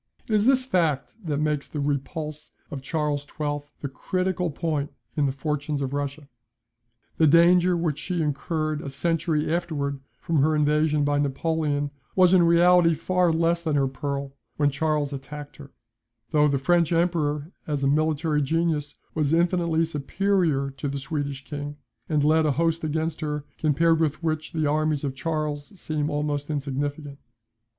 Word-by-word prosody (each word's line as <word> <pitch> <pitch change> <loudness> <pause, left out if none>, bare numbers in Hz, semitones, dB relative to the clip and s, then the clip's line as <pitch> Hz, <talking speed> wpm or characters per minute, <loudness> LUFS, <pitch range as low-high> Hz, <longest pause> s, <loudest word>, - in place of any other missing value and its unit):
It 220 - -2
is 210 +2 +3
this 260 -1 +4
fact 165 - 0
that 150 -4 -1
makes 150 -1 0
the 150 - -5
repulse 150 +2 -3 0.2
of 140 -3 -5
Charles 150 0 -1
XII. 145 0 -4
the 140 - -2
critical 185 +5 -1
point 150 -1 -2 0.2
in 145 -2 +2
the - - 0
fortunes 145 +1 -2
of 135 -1 -3
Russia. 145 0 -3 0.9
The 160 - +5
danger 175 +3 +5
which 160 -4 -1
she 180 +1 -3
incurred 155 +1 -1
a 140 - -5
century 155 +2 0
afterwards 150 -5 -2 0.2
from 165 - -1
her 155 +2 +3
invasion 150 0 +2
by 145 0 +1
Napoleon 145 0 0 0.2
was 185 -1 +5
in 185 - +7
reality 170 0 +5
far 180 +1 +1
less 170 +1 +1
than 155 -3 0
her 140 -1 +3
peril 140 +1 -4 0.2
when 145 -1 +3
Charles 150 0 0
attacked 140 +2 -8
her; 140 -1 -11 0.6
though 150 -1 +4
the 140 -1 +1
French 170 +4 +2
Emperor, 165 -3 0 0.2
as 145 -2 -1
a - - +3
military 155 +1 +1
genius, 155 0 0 0.2
was 155 -1 +1
infinitely 170 -1 +2
superior 160 -2 0
to 145 - -3
the 140 0 -3
Swedish 140 -1 -4
King, 145 0 -6 0.3
and 150 -3 +2
led 155 +1 +4
a 145 - +2
host 165 +2 0
against 160 +1 -2
her, 150 -1 -3
compared 160 +2 +3
with 155 0 0
which 155 -1 -2
the 160 -2 -1
armies 150 0 +1
of 140 -2 -2
Charles 150 +2 -3
seem 150 -2 -2
almost 145 -1 -2
insignificant. 145 0 -3
150 Hz, 160 wpm, -25 LUFS, 145-165 Hz, 0.9 s, in